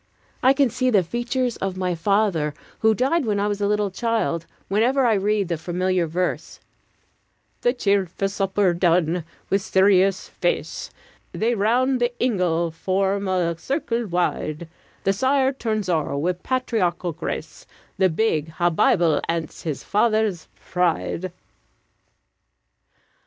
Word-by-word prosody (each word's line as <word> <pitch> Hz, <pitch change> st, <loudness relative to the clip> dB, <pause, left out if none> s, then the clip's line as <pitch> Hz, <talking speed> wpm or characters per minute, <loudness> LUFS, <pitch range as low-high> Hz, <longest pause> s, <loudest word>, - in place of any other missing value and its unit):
I 260 Hz, +2 st, +5 dB
can 275 Hz, -3 st, +2 dB
see 255 Hz, +2 st, +1 dB
the 205 Hz, -6 st, +4 dB
features 240 Hz, +5 st, -2 dB
of 190 Hz, -1 st, -3 dB
my 180 Hz, -1 st, 0 dB
father, 170 Hz, -4 st, +1 dB, 0.2 s
who 220 Hz, 0 st, +3 dB
died 275 Hz, -, +1 dB
when 210 Hz, -4 st, 0 dB
I 205 Hz, -, +1 dB
was 205 Hz, 0 st, -2 dB
a 200 Hz, -, +2 dB
little 210 Hz, -1 st, 0 dB
child, 220 Hz, -6 st, -1 dB, 0.2 s
whenever 245 Hz, +7 st, +2 dB
I 230 Hz, -, +4 dB
read 205 Hz, -1 st, +1 dB
the 170 Hz, -2 st, -2 dB
familiar 180 Hz, +1 st, 0 dB
verse: 180 Hz, +3 st, -3 dB, 1.0 s
"The 245 Hz, -, +3 dB
cheerfu' 200 Hz, -5 st, 0 dB
supper 195 Hz, -1 st, +1 dB
done, 170 Hz, -1 st, +2 dB, 0.3 s
wi' 195 Hz, -, +5 dB
serious 190 Hz, 0 st, +3 dB
face -, -, -2 dB, 0.4 s
They 230 Hz, +2 st, +1 dB
round 245 Hz, +5 st, +2 dB
the 240 Hz, 0 st, +2 dB
ingle 175 Hz, -8 st, +1 dB
form 195 Hz, +4 st, -1 dB
a 180 Hz, -3 st, 0 dB
circle 235 Hz, -, -2 dB
wide: 170 Hz, -3 st, -1 dB, 0.4 s
The 195 Hz, -, +2 dB
sire 265 Hz, +4 st, +2 dB
turns 215 Hz, -6 st, -2 dB
o'er, 155 Hz, -5 st, 0 dB
wi' 165 Hz, +6 st, +1 dB
patriarchal 185 Hz, -3 st, -1 dB
grace, -, -, -6 dB, 0.3 s
The 190 Hz, -1 st, +4 dB
big 160 Hz, -4 st, 0 dB
ha' 175 Hz, +2 st, +1 dB
Bible, 160 Hz, -1 st, +3 dB
ance 165 Hz, -2 st, -3 dB
his 155 Hz, -5 st, -4 dB
father's 215 Hz, -4 st, +1 dB
pride." 180 Hz, 0 st, -1 dB
195 Hz, 135 wpm, -23 LUFS, 175-230 Hz, 1.0 s, I